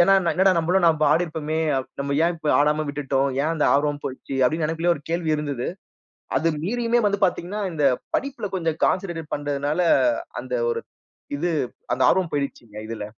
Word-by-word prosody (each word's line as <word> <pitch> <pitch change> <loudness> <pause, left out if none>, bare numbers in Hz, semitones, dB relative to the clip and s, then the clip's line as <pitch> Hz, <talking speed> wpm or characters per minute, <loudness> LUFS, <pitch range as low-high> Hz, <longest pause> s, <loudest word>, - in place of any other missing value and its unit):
ஏன்னா 195 +3 +6 0.2
என்னடா 190 +1 +4
நம்பளும் 175 +2 +2
நம்ப 160 -2 +3
ஆடிருப்பமே, 160 -2 -1 0.4
நம்ம 140 0 -1
ஏன் 175 - +2
இப்ப 155 -2 -4
ஆடாம 150 +1 +2
விட்டுட்டோம்? 140 -1 0
ஏன் 160 - 0
அந்த 155 - +1
ஆர்வம் 145 0 +1
போயிடுச்சு? 130 +1 -6
அப்டின்னு 155 +4 +1
எனக்குள்ளயே 165 +2 +1
ஒரு 145 - -13
கேள்வி 170 -2 0
இருந்துது. 140 -5 -3 0.7
அது 155 +5 +2 0.2
மீறியுமே 235 +4 +1
வந்து 200 0 +1
பாத்தீங்கன்னா, 185 +3 -1
இந்த 150 -2 -1 0.3
படிப்புல 275 -6 -3
கொஞ்சம் 165 -3 -1
கான்சென்ட்ரேட்டட் 170 -4 -1
பண்றதுனால 145 +2 -1 0.6
அந்த 125 0 -5 0.2
ஒரு - - -2 0.5
இது 170 +5 -1 0.4
அந்த - - 0
ஆர்வம் 185 -3 +1
போயிடுச்சுங்க 130 -7 -4
இதுல. 110 -2 -5
160 Hz, 160 wpm, -23 LUFS, 145-175 Hz, 0.7 s, ஏன்னா